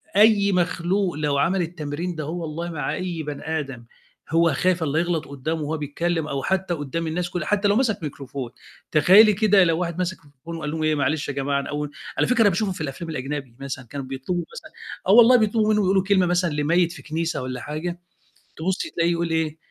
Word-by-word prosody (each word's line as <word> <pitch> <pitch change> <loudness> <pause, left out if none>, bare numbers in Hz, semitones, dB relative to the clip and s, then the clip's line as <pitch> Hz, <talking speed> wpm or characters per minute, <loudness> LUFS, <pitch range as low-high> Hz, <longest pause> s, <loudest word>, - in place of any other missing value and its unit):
أي 205 -1 +5
مخلوق 180 +1 0
لو 150 -2 0
عمل 180 +6 +2
التمرين 165 +1 -4
دهو 160 +3 -4
والله 165 +2 -4
مع 150 -4 -3
بَني 160 -3 -3
آدم 135 -5 -7 0.4
هو 165 0 +3
خايف 180 +4 +1
الّا 155 0 +1
يغلط 170 -2 -1
قدّامه 150 +3 -3
وهو 155 +2 -2
بيتكّلم 160 +2 -2
أو 140 -2 -3
حتى 190 -2 0
قدّام 160 +2 -3
الناس 175 +2 -2
كُلّه 175 -3 -3
حتى 205 0 +1
لو 205 - +3
مسك 225 -8 +1
ميكروفون، 135 -4 -6 0.4
تخيّلي 195 +8 +7
كده 205 -1 +4
لو 165 -1 +2
واحد 170 -1 -2
ماسِك 185 0 -2
ميكروفون 145 +4 -10
وقال 150 -2 -4
لهم 160 0 -3
إيه 155 0 +2
معلش 145 +1 0
يا - - -2
جماعة 140 +1 0
أنا 140 - -6
أول 150 0 -3 0.3
على - - +2
فكرة 245 -1 +3
أنا 205 - +6
باشوفه 195 +2 0
في 180 - -6
الأفلام 155 +3 -5
الأجنبي 135 -3 -5
مثلًا 130 -2 -6
كانوا 135 +3 -6
بيطلبوا 135 +7 -3
مثلًا - - -10 0.4
آه 205 +5 +7
الله، 250 +2 +7
بيطلبوا 215 -1 +2
مِنّه 210 - +2
يقولوا 190 0 +3
كلمة 190 -1 +3
مثلًا 175 0 +1
لميّت 165 +4 +2
في - - -10
كنيسة 165 -2 -2
والّا 125 -1 -5
حاجة، 165 +5 -4 0.6
تبُصي 185 - -2
تلاقيه 170 0 +1
يقول 170 0 -1
إيه 160 -1 -1
165 Hz, 205 wpm, -23 LUFS, 145-180 Hz, 0.6 s, تخيّلي